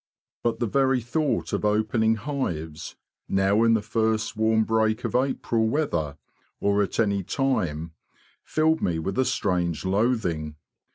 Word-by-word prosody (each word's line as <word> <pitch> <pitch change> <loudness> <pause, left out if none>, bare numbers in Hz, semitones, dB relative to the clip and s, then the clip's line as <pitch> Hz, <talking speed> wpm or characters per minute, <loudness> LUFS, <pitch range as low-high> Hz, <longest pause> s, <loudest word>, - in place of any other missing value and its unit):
But 120 -1 -1
the 120 - +1
very 135 +3 +2
thought 140 +5 -1
of - - -1
opening 110 +2 +2
hives, 95 - -4 0.3
now 95 +2 +2
in 115 0 +5
the 110 - -1
first 110 +1 0
warm 110 0 +3
break 110 +1 +1
of - - -3
April 125 -3 +1
weather 95 - -1 0.4
or 100 0 +2
at 100 - -2
any 100 -3 +2
time, 85 - -1 0.5
filled 160 +1 +1
me 85 -2 0
with 95 +8 -3
a 130 - +3
strange 90 - -1
loathing. 95 -7 0
110 Hz, 145 wpm, -25 LUFS, 95-120 Hz, 0.5 s, in